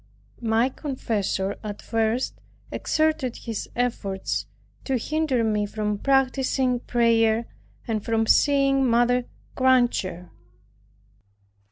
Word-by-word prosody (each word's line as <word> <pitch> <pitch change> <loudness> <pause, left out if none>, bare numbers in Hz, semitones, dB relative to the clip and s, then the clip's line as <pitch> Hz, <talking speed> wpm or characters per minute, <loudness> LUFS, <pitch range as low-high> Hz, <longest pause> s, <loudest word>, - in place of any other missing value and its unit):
My 225 +1 +2
confessor 215 -8 -2
at 210 -1 -5
first 225 +2 -1 0.3
exerted 310 -5 0
his 225 -3 -5
efforts 215 -6 -2 0.4
to 265 -2 0
hinder 295 -1 0
me 210 -2 0
from 210 -1 -2
practicing 265 -1 +1
prayer, 230 -2 +2 0.4
and 220 -3 -1
from 225 -1 +1
seeing 275 +2 +4
Mother 245 0 +3 0.3
Granger. 240 -9 +1
235 Hz, 90 wpm, -24 LUFS, 220-260 Hz, 0.4 s, seeing